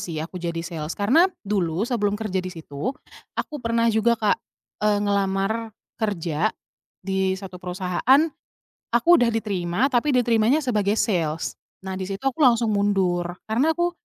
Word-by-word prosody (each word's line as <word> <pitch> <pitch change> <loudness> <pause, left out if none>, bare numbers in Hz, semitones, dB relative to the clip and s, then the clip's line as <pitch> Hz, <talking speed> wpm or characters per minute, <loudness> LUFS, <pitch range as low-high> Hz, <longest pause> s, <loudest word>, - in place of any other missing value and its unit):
sih, 160 -3 -4
aku 180 +1 -8
jadi 170 -1 -3
sales, 160 -1 -5
karena 270 - +4 0.2
dulu 190 -2 0
sebelum 210 -4 0
kerja 200 -4 -2
di 185 - -5
situ, 165 - -5 0.4
aku 305 - -3
pernah 230 0 +1
juga 230 +2 +3
Kak, 215 -2 +1 0.4
eee, 210 -1 +3
ngelamar 200 +3 0 0.3
kerja 180 -3 0 0.6
di 190 -1 0
1 185 -2 -9
perusahaan, 185 +9 +2 0.7
aku 240 +7 +2
udah 240 - +4
diterima, 210 +2 0
tapi 255 +3 +2
diterimanya 240 +4 +3
sebagai 210 -4 +1
sales. 165 -9 -1 0.2
Nah, 190 0 -5
di 185 - -4
situ 195 +5 -5
aku 270 +3 -1
langsung 235 -5 +4
mundur, 190 -4 +1 0.2
karena 270 +9 +2
aku 350 0 +1
205 Hz, 150 wpm, -24 LUFS, 180-235 Hz, 0.7 s, karena